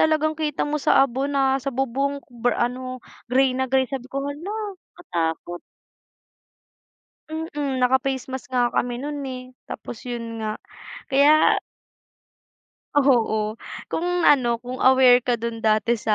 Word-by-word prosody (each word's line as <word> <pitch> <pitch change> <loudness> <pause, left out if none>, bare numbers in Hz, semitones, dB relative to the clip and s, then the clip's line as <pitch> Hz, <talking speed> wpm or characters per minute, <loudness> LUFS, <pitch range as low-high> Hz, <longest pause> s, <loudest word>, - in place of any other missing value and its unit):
talagang 310 0 +3
kita 305 -2 -2
mo 295 0 -2
sa 270 - +5
abo 270 +2 -2
na 270 -1 +1
sa 275 - -4
bubong 275 +2 -1
br 240 0 0
ano 255 +1 -3 0.2
grey 260 +1 +3
na 260 0 -1
grey 265 0 +3
sabi 260 -1 -6
ko, 275 +1 -3
"hala, 335 +8 -7 0.4
katakot". 175 - -3 1.7
Mm, 295 -4 -3
naka 250 +1 +4
face 265 -2 -1
mask 260 0 -7
nga 245 -1 +3
kami 245 0 0
nun, 290 +1 -4
eh. 255 -1 -6 0.2
Tapos - - -7
yun 240 -1 -4 0.2
nga 215 -1 -2 0.6
kaya 290 +3 +5 1.3
Oo. 260 -6 +3 0.6
Kung 345 - -1 0.2
ano, 275 -6 +5 0.2
kung 250 +1 -6
aware 260 -1 +7
ka 245 0 0
dun 230 0 -4
dati 220 +1 +2
sa 215 0 +1
260 Hz, 140 wpm, -23 LUFS, 245-280 Hz, 1.7 s, aware